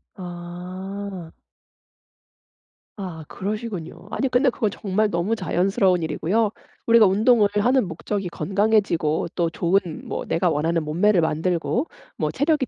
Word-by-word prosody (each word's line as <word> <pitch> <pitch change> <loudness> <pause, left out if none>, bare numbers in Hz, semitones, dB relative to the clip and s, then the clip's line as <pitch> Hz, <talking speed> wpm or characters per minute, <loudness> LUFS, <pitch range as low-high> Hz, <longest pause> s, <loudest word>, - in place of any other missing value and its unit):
아. 180 +1 -7 1.6
아 175 -6 -6
그러시군요. 200 -3 -5
아니 270 - 0
근데 255 +1 +3
그건 220 -2 0
정말 205 +1 0
너무 175 +5 0
자연스러운 185 -2 +1
일이고요. 180 +8 0 0.3
우리가 230 -2 +6
운동을 210 +2 +4
하는 245 +2 +3
목적이 185 +3 -3
건강해지고 195 -5 +1
또 170 -2 +1
좋은 175 +3 +2 0.3
뭐 - - -4
내가 175 +1 +1
원하는 165 +2 0
몸매를 175 +6 +3
만들고 170 - 0 0.3
뭐 - - 0
체력이 285 -1 +1
190 Hz, 290 characters per minute, -23 LUFS, 170-215 Hz, 1.6 s, 우리가